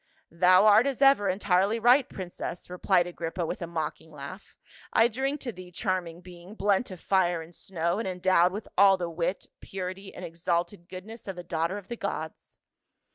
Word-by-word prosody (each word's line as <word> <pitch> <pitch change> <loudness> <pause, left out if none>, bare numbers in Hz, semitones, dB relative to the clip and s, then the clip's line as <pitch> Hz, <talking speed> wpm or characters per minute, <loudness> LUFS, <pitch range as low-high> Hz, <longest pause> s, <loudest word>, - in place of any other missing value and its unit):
" - - -38
Thou 185 +3 +5
art 215 +5 +6
as 275 -3 -2
ever 270 -8 +5
entirely 195 +2 +2
right, 245 +4 +5
princess," 180 -1 -7
replied 180 0 +2
Agrippa 170 0 -4
with - - -5
a 170 - -3
mocking 160 -1 -4
laugh. 150 +7 -10 0.2
" - - -20
I 225 - +5
drink 270 +5 -2
to 245 - -4
thee, 185 -3 -12
charming 175 -2 -3
being, 180 +2 -12
blent 205 +3 +1
of 185 -2 -9
fire 175 -3 +1
and 165 +2 -15
snow, 170 +1 -2
and 225 - -3
endowed 180 -1 +3
with 210 +3 -6
all 195 0 +6
the 175 -2 -4
wit, 170 +3 -2
purity, 190 +1 -6
and 180 - -7
exalted 170 +2 -2
goodness 205 +5 -10
of 190 -2 -5
a 175 - -6
daughter 165 +3 -2
of 200 -2 -10
the 235 - -5
gods." 160 -6 -6
185 Hz, 190 wpm, -28 LUFS, 175-205 Hz, 0.2 s, art